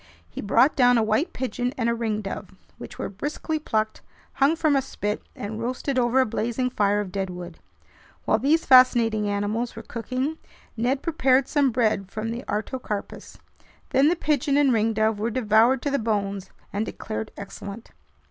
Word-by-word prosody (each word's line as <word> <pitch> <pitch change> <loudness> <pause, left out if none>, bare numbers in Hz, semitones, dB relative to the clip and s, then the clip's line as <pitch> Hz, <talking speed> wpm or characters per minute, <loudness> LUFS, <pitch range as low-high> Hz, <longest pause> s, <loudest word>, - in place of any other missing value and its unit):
He - - -7
brought 235 +7 +3
down 245 -2 +5
a 225 - +3
white 225 +11 +1
pigeon 250 0 -3
and 230 -3 0
a 235 - +2
ringdove, 215 -4 -4 0.2
which - - -9
were - - -3
briskly 295 +9 -3
plucked, 220 -7 -1 0.3
hung 285 +4 +3
from 310 -3 +2
a 275 - +3
spit, 210 -5 -3
and 215 +2 -5
roasted 255 +2 -1
over 245 +1 +2
a 260 - +4
blazing 240 +3 -1
fire 205 -2 +2
of 195 -3 -6
deadwood. 180 -3 -5 0.7
While 215 - +2
these 300 +7 +2
fascinating 235 -5 +5
animals 205 +4 -2
were 225 - -8
cooking, 255 +7 -3 0.4
Ned 250 +4 0
prepared 270 -5 +2
some 285 -3 +2
bread 220 -5 0
from 220 +2 -4
the 235 +3 -5
artocarpus. 210 0 -4 0.5
Then 270 +2 +4
the 350 - +2
pigeon 290 -3 +1
and 285 -2 +4
ringdove 220 -1 +1
were 220 +2 0
devoured 235 +2 +3
to 285 - -1
the 280 - +1
bones 200 -3 -2 0.2
and 205 +2 0
declared 220 0 -5
excellent. 200 +2 -8
230 Hz, 165 wpm, -25 LUFS, 210-260 Hz, 0.7 s, down